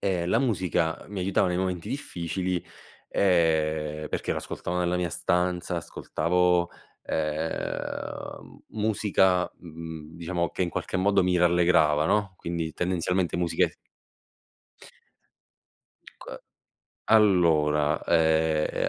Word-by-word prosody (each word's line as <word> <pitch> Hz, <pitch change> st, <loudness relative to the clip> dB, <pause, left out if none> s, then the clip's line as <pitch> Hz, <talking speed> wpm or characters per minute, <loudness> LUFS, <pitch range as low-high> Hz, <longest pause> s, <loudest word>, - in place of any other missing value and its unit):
ehm, 90 Hz, -3 st, -1 dB
la 115 Hz, -, +3 dB
musica 90 Hz, -, 0 dB
mi 100 Hz, -2 st, -5 dB
aiutava 95 Hz, 0 st, +1 dB
nei 90 Hz, -, -1 dB
momenti 90 Hz, -2 st, -2 dB
difficili, 90 Hz, -, -3 dB, 0.5 s
ehm, 80 Hz, -4 st, +1 dB
perché -, -, -2 dB
la -, -, -4 dB
ascoltavo 90 Hz, +1 st, -4 dB
nella 90 Hz, 0 st, +1 dB
mia 90 Hz, -1 st, -1 dB
stanza, 90 Hz, +1 st, 0 dB
ascoltavo, 90 Hz, +1 st, 0 dB, 0.3 s
ehm, 80 Hz, +1 st, -4 dB
musica, 100 Hz, -4 st, +2 dB
mhmm, 80 Hz, -1 st, -9 dB
diciamo 85 Hz, 0 st, -2 dB
che -, -, -2 dB
in 85 Hz, -, -1 dB
qualche -, -, -3 dB
modo 95 Hz, +1 st, +3 dB
mi 90 Hz, 0 st, +2 dB
rallegrava, 85 Hz, -3 st, +3 dB
no, 105 Hz, -2 st, +1 dB
quindi 85 Hz, -2 st, -4 dB
tendenzialmente 90 Hz, +1 st, -1 dB
musiche 85 Hz, -1 st, +1 dB, 2.3 s
C -, -, -11 dB, 0.7 s
allora, 80 Hz, -8 st, +4 dB
ehm, 80 Hz, -1 st, +2 dB
90 Hz, 105 wpm, -26 LUFS, 80-90 Hz, 2.3 s, allora